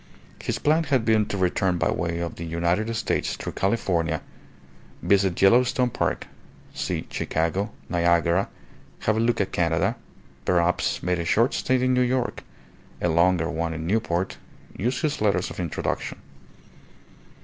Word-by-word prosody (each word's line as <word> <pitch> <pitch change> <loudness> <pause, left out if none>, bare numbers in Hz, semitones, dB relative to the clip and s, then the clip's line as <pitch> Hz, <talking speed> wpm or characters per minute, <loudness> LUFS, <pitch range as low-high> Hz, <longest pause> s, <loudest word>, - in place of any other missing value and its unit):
His - - -2
plan 155 +2 +2
had 135 -5 +1
been 110 -2 +3
to 100 - -3
return 90 0 +1
by - - +1
way 85 -1 -2
of 85 - -4
the 85 - -5
United 85 +6 0
States - - -1
through - - -5
California, 95 -5 0 0.8
visit 95 -3 +2
Yellowstone 125 +5 +4
Park, - - -1 0.5
see - - -3
Chicago, 85 +6 -1 0.2
Niagara, 85 +1 +2 0.5
have 110 - +1
a - - 0
look 115 +1 +2
at 100 - 0
Canada, 85 -1 +1 0.5
perhaps 90 0 +1
make 90 0 0
a - - -1
short 115 +9 +3
stay 130 0 +1
in 130 0 +3
New 125 - +3
York, 125 0 0 0.6
a 85 - +1
longer 85 0 +3
one 85 -1 -2
in 80 0 -5
Newport, 95 -2 -1 0.4
use 125 +4 -1
his 150 -6 -1
letters 100 -4 +1
of - - -8
introduction. 85 -4 -3
95 Hz, 150 wpm, -25 LUFS, 85-115 Hz, 0.8 s, Yellowstone